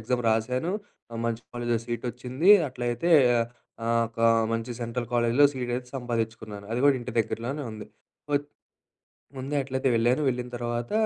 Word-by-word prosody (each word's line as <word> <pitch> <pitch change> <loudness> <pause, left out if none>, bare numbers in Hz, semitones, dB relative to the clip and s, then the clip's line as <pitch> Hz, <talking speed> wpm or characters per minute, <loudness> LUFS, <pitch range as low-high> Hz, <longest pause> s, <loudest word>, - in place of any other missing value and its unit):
Exam 125 +2 0
రాశాను, 125 - 0 0.4
ఆ - - -7
మంచి 115 0 -2
కాలేజీలో 120 -1 0
సీటొచ్చింది. 125 - 0 0.2
అట్లయితే, 120 +7 -2 0.7
ఆహ్, 115 0 +2
ఒక 115 0 -9 0.3
మంచి 115 +1 -2
సెంట్రల్ 120 0 -3
కాలేజిలో 120 +4 +4
సీట్ 125 -2 -3
అయితే 125 0 -7
సంపాదించుకున్నాను. 110 -4 -4
అది 120 - 0
గూడా 145 - +6
ఇంటి 120 0 -6
దగ్గరలోనే 120 +6 -1
ఉంది. 110 -1 -8 0.5
ఒచ్ 145 0 +1 0.9
ముందే 135 +3 -4
అట్లైతే 130 0 -1
వెళ్ళాను 120 +5 +2
వెళ్ళిన 125 0 -3
తర్వాత 120 0 -3
120 Hz, 140 wpm, -27 LUFS, 115-130 Hz, 0.9 s, గూడా